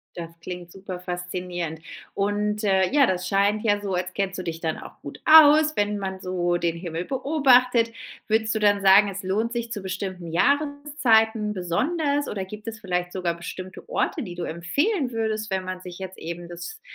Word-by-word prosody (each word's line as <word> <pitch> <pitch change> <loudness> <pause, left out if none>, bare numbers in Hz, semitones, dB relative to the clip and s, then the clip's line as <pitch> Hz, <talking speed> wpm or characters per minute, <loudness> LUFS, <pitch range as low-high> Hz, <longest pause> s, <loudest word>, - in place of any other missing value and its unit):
Das 165 -1 -6
klingt 175 -1 -7
super 190 -2 -7
faszinierend. 180 -2 -4 0.4
Und, 210 +1 -1
äh, 190 -2 +3
ja, 285 -2 +5
das 185 -2 -1
scheint 200 +2 +2
ja 205 -2 +2
so, 200 -2 -4
als 180 +1 -2
kennst 195 -2 -2
du - - -4
dich 165 -1 -4
dann 160 -2 -2
auch - - -12
gut 140 - -9
aus, 310 0 +8
wenn 205 0 0
man 190 -1 -4
so 175 -2 -1
den 170 -1 -1
Himmel 170 0 -5
beobachtet. 255 -4 +3 0.4
Würdest 220 0 +1
du - - +1
dann 205 -1 +3
sagen, 195 +1 +7
es 195 0 -6
lohnt 220 +5 -1
sich 235 -1 -3
zu 205 - -4
bestimmten 185 -2 -5
Jahreszeiten 240 - +2
besonders 285 - 0
oder 195 -2 -3
gibt 210 +3 -10
es 220 0 -5
vielleicht 180 -3 -2
sogar 175 -3 -1
bestimmte 185 - -8
Orte, 340 - -1
die 180 -4 -7
du 175 - -4
empfehlen 275 - -1
würdest, 220 -2 -2
wenn 190 -1 -1
man 185 0 -5
sich 180 0 -9
jetzt 190 0 -7
eben 170 +1 -6
das 175 0 -8
195 Hz, 190 wpm, -24 LUFS, 180-225 Hz, 0.4 s, aus